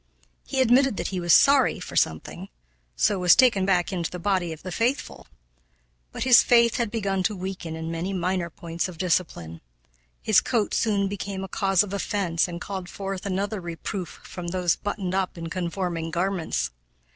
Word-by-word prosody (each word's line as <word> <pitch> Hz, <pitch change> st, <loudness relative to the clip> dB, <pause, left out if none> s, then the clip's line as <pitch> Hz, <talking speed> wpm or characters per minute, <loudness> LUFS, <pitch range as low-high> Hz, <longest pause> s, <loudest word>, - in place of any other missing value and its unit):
He 265 Hz, -, 0 dB
admitted 260 Hz, -1 st, +4 dB
that -, -, -2 dB
he 185 Hz, -, -3 dB
was 175 Hz, -1 st, 0 dB
"sorry" 275 Hz, -, +5 dB
for 180 Hz, -, -8 dB
something, 80 Hz, -1 st, -1 dB, 0.5 s
so 190 Hz, -, +2 dB
was 180 Hz, -1 st, +6 dB
taken 230 Hz, -7 st, +4 dB
back 180 Hz, -1 st, +1 dB
into 170 Hz, -3 st, -2 dB
the 180 Hz, -, -6 dB
body 180 Hz, -2 st, 0 dB
of 160 Hz, -, -9 dB
the 185 Hz, -, -6 dB
faithful! 240 Hz, +8 st, -2 dB, 0.8 s
But -, -, -4 dB
his 255 Hz, -2 st, +7 dB
faith 235 Hz, -1 st, +4 dB
had 235 Hz, -3 st, 0 dB
begun 200 Hz, -4 st, -1 dB
to 205 Hz, +3 st, 0 dB
weaken 185 Hz, -3 st, -5 dB
in 160 Hz, 0 st, -5 dB
many 170 Hz, +4 st, -3 dB
minor 180 Hz, -1 st, -1 dB
points 170 Hz, +1 st, -4 dB
of 175 Hz, -, -10 dB
discipline. 165 Hz, -, -2 dB, 0.6 s
His 215 Hz, -3 st, +4 dB
coat 225 Hz, -5 st, 0 dB
soon 200 Hz, -3 st, +1 dB
became 195 Hz, -1 st, -5 dB
a -, -, -5 dB
cause 195 Hz, 0 st, +2 dB
of 200 Hz, -1 st, -7 dB
offense 195 Hz, -4 st, 0 dB
and 170 Hz, -1 st, -6 dB
called 190 Hz, -1 st, -6 dB
forth 195 Hz, 0 st, -5 dB
another 200 Hz, +1 st, -2 dB
reproof 170 Hz, +2 st, -6 dB
from 175 Hz, -1 st, -7 dB
those 175 Hz, -1 st, +1 dB
buttoned 200 Hz, -3 st, -4 dB
up 190 Hz, -2 st, -1 dB
in 165 Hz, -1 st, -6 dB
conforming 175 Hz, -2 st, -3 dB
garments. 170 Hz, -, -1 dB
185 Hz, 180 wpm, -25 LUFS, 170-200 Hz, 0.8 s, his